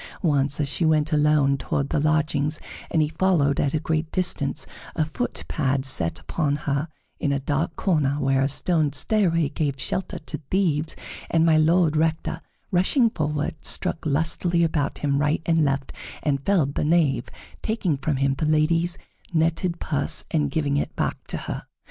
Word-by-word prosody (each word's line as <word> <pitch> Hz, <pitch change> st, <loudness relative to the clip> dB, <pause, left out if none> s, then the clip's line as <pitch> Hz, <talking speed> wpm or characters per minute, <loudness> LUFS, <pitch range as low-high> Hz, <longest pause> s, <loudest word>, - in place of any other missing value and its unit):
Once, 145 Hz, -3 st, +2 dB
as 145 Hz, -, 0 dB
she 145 Hz, -, -1 dB
went 155 Hz, 0 st, +2 dB
alone 150 Hz, -2 st, +3 dB
toward 140 Hz, +1 st, -2 dB
the -, -, +1 dB
lodgings, 155 Hz, 0 st, +1 dB, 0.3 s
and 160 Hz, -2 st, +2 dB
he -, -, 0 dB
followed 155 Hz, -4 st, +1 dB
at 140 Hz, +1 st, +1 dB
a -, -, +1 dB
great 160 Hz, 0 st, -2 dB
distance, 160 Hz, -5 st, 0 dB, 0.3 s
a 155 Hz, -, +1 dB
foot 245 Hz, +11 st, -4 dB
pad 135 Hz, -2 st, 0 dB
set 85 Hz, -, -1 dB
upon 150 Hz, -4 st, -1 dB
her 145 Hz, +1 st, -2 dB, 0.3 s
in 145 Hz, -, 0 dB
a 140 Hz, -, +1 dB
dark 150 Hz, +4 st, -1 dB
corner, 150 Hz, -7 st, +1 dB
where 135 Hz, -1 st, +2 dB
a 135 Hz, -, +2 dB
stone 155 Hz, 0 st, +3 dB
stairway 165 Hz, +2 st, +2 dB
gave 145 Hz, -2 st, -2 dB
shelter 185 Hz, -, -3 dB
to 155 Hz, 0 st, -6 dB
thieves, 165 Hz, -5 st, 0 dB, 0.3 s
and 165 Hz, -1 st, +3 dB
My 160 Hz, -1 st, +5 dB
Lord 160 Hz, 0 st, +3 dB
Rector, 160 Hz, +1 st, 0 dB, 0.3 s
rushing 220 Hz, +7 st, +3 dB
forward, 150 Hz, -2 st, -2 dB
struck 165 Hz, -, +1 dB
lustily 165 Hz, +3 st, +1 dB
about 155 Hz, -3 st, 0 dB
him 140 Hz, -1 st, 0 dB
right 150 Hz, +2 st, +1 dB
and 165 Hz, -1 st, +3 dB
left 140 Hz, -1 st, -1 dB, 0.3 s
and 140 Hz, -2 st, 0 dB
felled 160 Hz, -8 st, +2 dB
the -, -, -1 dB
knave, 150 Hz, -6 st, +2 dB, 0.3 s
taking 210 Hz, -8 st, 0 dB
from 140 Hz, +2 st, -1 dB
him 135 Hz, +1 st, +1 dB
the 155 Hz, -, -1 dB
lady's 165 Hz, +3 st, +2 dB, 0.3 s
netted 170 Hz, +1 st, 0 dB
purse 145 Hz, -3 st, 0 dB
and 150 Hz, -3 st, +1 dB
giving 145 Hz, -1 st, 0 dB
it -, -, -2 dB
back -, -, -3 dB
to -, -, -3 dB
her. -, -, -5 dB
155 Hz, 175 wpm, -24 LUFS, 140-165 Hz, 0.3 s, My